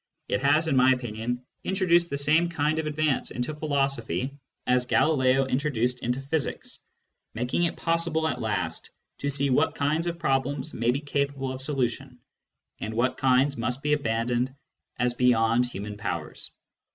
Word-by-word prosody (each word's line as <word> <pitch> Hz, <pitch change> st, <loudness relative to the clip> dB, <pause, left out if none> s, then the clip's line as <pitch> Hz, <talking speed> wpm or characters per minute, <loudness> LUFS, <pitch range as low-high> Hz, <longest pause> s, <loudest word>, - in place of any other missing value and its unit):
It 100 Hz, -, 0 dB
has, 150 Hz, +4 st, +3 dB
in 145 Hz, -, +1 dB
my 130 Hz, 0 st, +6 dB
opinion, 120 Hz, 0 st, -4 dB, 0.2 s
introduced 175 Hz, -3 st, +2 dB
the 140 Hz, -, -2 dB
same 155 Hz, +4 st, +3 dB
kind 155 Hz, -1 st, 0 dB
of 155 Hz, -, -2 dB
advance 150 Hz, -2 st, 0 dB
into 125 Hz, +5 st, -3 dB
philosophy 140 Hz, -3 st, -1 dB, 0.3 s
as 125 Hz, 0 st, +2 dB
Galileo 135 Hz, -3 st, +3 dB
introduced 125 Hz, -2 st, 0 dB
into 125 Hz, +2 st, -1 dB
physics, 140 Hz, +2 st, -2 dB, 0.6 s
making 125 Hz, +9 st, 0 dB
it 170 Hz, -, -2 dB
possible 165 Hz, -1 st, +1 dB
at 125 Hz, -, -2 dB
last 100 Hz, -7 st, -2 dB, 0.3 s
to 140 Hz, -, -1 dB
see 140 Hz, 0 st, 0 dB
what 150 Hz, +5 st, +2 dB
kinds 155 Hz, +4 st, 0 dB
of 170 Hz, 0 st, -2 dB
problems 145 Hz, 0 st, -1 dB
may 115 Hz, +1 st, 0 dB
be 135 Hz, +4 st, +1 dB
capable 140 Hz, -2 st, -2 dB
of 130 Hz, -, -6 dB
solution, 130 Hz, -2 st, -2 dB, 0.6 s
and 110 Hz, +1 st, -4 dB
what 125 Hz, +2 st, +1 dB
kinds 135 Hz, +1 st, +3 dB
must 125 Hz, +3 st, -2 dB
be 150 Hz, 0 st, +2 dB
abandoned 120 Hz, -1 st, 0 dB, 0.4 s
as 125 Hz, 0 st, +1 dB
beyond 120 Hz, -1 st, +3 dB
human 105 Hz, -2 st, -6 dB
powers. 105 Hz, -, -3 dB
135 Hz, 155 wpm, -26 LUFS, 125-150 Hz, 0.6 s, my